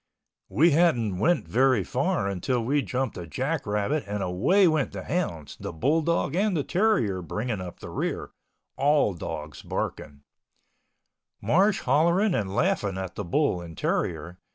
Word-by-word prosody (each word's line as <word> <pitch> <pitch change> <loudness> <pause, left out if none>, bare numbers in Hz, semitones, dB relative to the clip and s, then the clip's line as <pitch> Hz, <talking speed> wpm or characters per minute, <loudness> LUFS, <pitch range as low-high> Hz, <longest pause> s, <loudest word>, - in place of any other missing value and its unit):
We 165 +4 +4
hadn't 125 - +2
went 170 - +2
very 130 -3 +3
far 135 - 0
until 105 +6 -1
we 145 +4 +2
jumped 130 -5 -3
a 85 - -7
jack 135 - -2
rabbit 105 +9 0
and 105 -1 -2
away 125 - +3
went 155 -4 +1
the - - -6
hounds, 85 - -3
the - - -5
bull 140 - +1
dog 170 -2 0
and 195 -1 +1
the 145 - 0
terrier 135 - +1
bringing 105 +3 -3
up 90 -1 -8
the - - -8
rear—all 145 -7 -1
dogs 75 -3 -6
barking, 70 -2 -5 1.2
Marsh 190 - +2
hollering 170 +9 +3
and 100 - -1
laughing 110 - 0
at 95 -1 -5
the 105 - -5
bull 95 - +1
and 85 -2 -10
terrier. 85 +2 -2
125 Hz, 155 wpm, -26 LUFS, -, 1.2 s, We